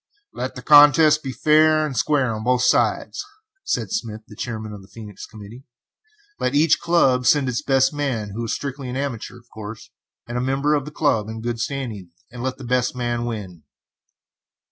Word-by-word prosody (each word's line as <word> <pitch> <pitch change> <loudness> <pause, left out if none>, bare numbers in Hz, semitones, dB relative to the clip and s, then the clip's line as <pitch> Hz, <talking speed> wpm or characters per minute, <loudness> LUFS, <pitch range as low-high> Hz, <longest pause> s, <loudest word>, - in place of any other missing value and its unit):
"Let - - -5
the - - -9
contest 150 +1 +7
be 135 - -5
fair 155 +2 +4
and 140 -3 -5
square 135 -4 +1
on 110 0 -5
both 125 +1 +2
sides," - - +1 0.4
said 110 -5 -2
Smith, 110 -2 -3
the 105 - -13
chairman 110 -2 -5
of 105 - -9
the 95 - -16
Phœnix 105 -2 -11
committee. 110 +4 -12 0.8
"Let 125 - -1
each 155 +2 +4
club 130 -8 +2
send 140 0 +4
its 125 +2 -1
best 135 -1 +2
man, 130 -8 -2
who 115 +4 -4
is 115 - -1
strictly 140 -2 -5
an 125 - -4
amateur, 135 -4 -4
of 120 0 -20
course, 110 0 -9 0.4
and 120 +1 -3
a - - -1
member 135 +3 +1
of 145 -3 0
the 150 - -8
club, 125 -9 0
in 110 0 -6
good 115 0 -3
standing, 115 -9 -4 0.2
and 120 0 -8
let 130 +1 -3
the 135 - -10
best 125 0 0
man 120 -1 -2
win." 100 -8 -6
125 Hz, 190 wpm, -22 LUFS, 110-140 Hz, 0.8 s, contest